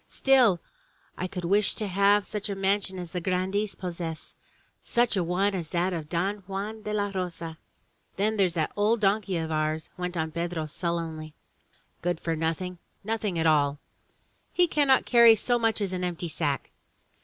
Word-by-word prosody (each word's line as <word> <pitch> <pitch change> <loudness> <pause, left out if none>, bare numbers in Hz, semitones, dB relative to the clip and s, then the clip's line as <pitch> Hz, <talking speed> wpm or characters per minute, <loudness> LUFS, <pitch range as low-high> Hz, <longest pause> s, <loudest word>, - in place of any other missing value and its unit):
"Still 250 -9 +4 0.6
I 185 - -3
could 180 -1 -5
wish 200 +4 +2
to 215 - -2
have 200 +1 +3
such 210 -1 -4
a 200 - -2
mansion 195 0 0
as 175 -2 -6
the 180 - -3
grandees 190 +3 -1
possess 170 -3 -6 0.3
— - - -38
such 240 -2 +2
a 185 - +1
one 190 +4 +1
as 175 -4 -3
that 180 +2 0
of 155 -3 -5
Don 185 +5 0
Juan 205 +3 -4
de 210 - -5
la 205 -1 0
Rosa." 170 -3 -4 0.3
" - - -42
Then 215 +3 +1
there's 185 -4 +2
that 155 -2 0
old 215 +3 +2
donkey 200 -2 +1
of 160 -1 -3
ours," 155 0 -1
went 180 0 -3
on 160 -1 -1
Pedro 170 -1 -2
sullenly. 160 -1 -4 0.7
"Good 175 -1 -1
for 165 -1 -2
nothing 165 +3 -2
— - - -33
^nothing 215 -4 -1
at 165 - 0
all. 145 -2 +3 0.7
He 360 - +4
cannot 285 -4 +3
carry 235 -2 +7
so 240 +3 +1
much 225 -1 +1
as 195 -2 -1
an 180 0 -2
empty 175 -1 -3
sack. 145 -4 -2
185 Hz, 185 wpm, -27 LUFS, 165-205 Hz, 0.7 s, carry